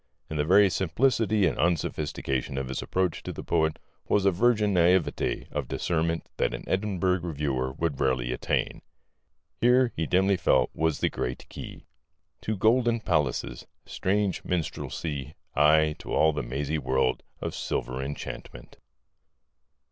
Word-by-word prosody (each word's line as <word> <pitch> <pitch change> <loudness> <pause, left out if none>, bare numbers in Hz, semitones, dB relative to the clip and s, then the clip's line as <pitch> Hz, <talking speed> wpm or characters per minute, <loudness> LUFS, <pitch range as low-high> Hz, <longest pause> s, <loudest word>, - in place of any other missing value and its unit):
In 80 - -2
the 75 - +2
very 100 +5 +6
simplicity 110 +3 +2
and 80 - 0
unsophistication 75 -5 -1
of 65 -1 -3
his 65 - -3
approach 90 -3 -1
to - - -5
the - - -7
poet 80 0 +1 0.3
was 100 -1 +2
a 100 - +5
virgin 105 +1 +2
naïveté 85 -3 +2
of - - -3
discernment 80 -1 -1
that - - 0
an - - -8
Edinburgh 95 -2 0
Reviewer 70 -6 -2
would 75 -1 -2
rarely 65 -2 +1
attain. 60 - -1 0.8
Here, 125 0 +4
he 80 -1 -1
dimly 95 +1 +3
felt, 85 - +2
was 80 -1 0
the - - +3
great 60 - -4
key - - -9 0.6
To 110 -1 -2
golden 115 +3 +3
palaces, 75 - -1 0.2
strange 100 0 -1
minstrelsy,... 75 -4 -3 0.2
aye, 75 +1 +5
to - - -8
all 80 0 +4
the 75 - -2
mazy 70 +5 -2
world 65 -1 +1 0.2
Of - - -4
silvery 65 +1 -3
enchantment. 70 -3 -8
80 Hz, 140 wpm, -27 LUFS, 70-95 Hz, 0.8 s, very